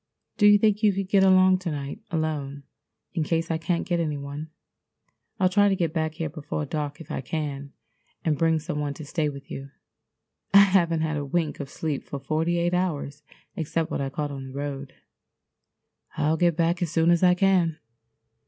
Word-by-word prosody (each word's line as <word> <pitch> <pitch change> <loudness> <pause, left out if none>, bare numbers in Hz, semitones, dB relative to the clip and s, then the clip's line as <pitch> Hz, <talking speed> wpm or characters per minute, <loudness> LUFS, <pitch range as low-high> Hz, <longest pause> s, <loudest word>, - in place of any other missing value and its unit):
Do 205 - +6
you 205 0 +8
think 210 0 +2
you 210 -2 +4
could 195 0 -3
get 195 -1 +4
along 185 -1 +5
to 180 -2 -4
night 145 +6 -5
alone 150 -4 -3 0.5
in 165 -4 0
case 165 +2 -1
I 160 - 0
can't 170 +1 -1
get 175 -2 0
any 155 -3 -1
one? 140 +2 -6 0.9
I'll 185 - +4
try 205 +2 +4
to 195 - +2
get 170 -4 -1
back 160 -1 -1
here 165 - -2
before 150 0 -4
dark 150 0 -4
if 160 -1 -10
I - - -2
can 140 0 -4 0.5
and 155 -2 +2
bring 165 +2 +2
some 155 -1 -4
one 145 -1 -2
to 155 - -8
stay 150 +1 -1
with 140 -1 -10
you. 135 +1 -6 0.9
I 200 - +11
haven't 175 -5 +3
had 155 -1 -1
a 145 - -2
wink 155 +2 -1
of 140 -2 -5
sleep 150 -2 -3
for 140 - -6
forty 160 +4 0
eight 175 +1 0
hours 150 -5 -2 0.3
except 160 0 -2
what - - -1
I 135 - -2
caught 145 +1 -3
on 135 -1 -7
the 130 - -10
road. 140 -1 -5 1.2
I'll 155 +2 +2
get 170 -1 +2
back 170 +1 +1
as 175 - 0
soon 165 +1 +3
as 170 - +3
I 180 -1 +5
can." 180 -4 +2
160 Hz, 200 wpm, -25 LUFS, 145-175 Hz, 1.2 s, I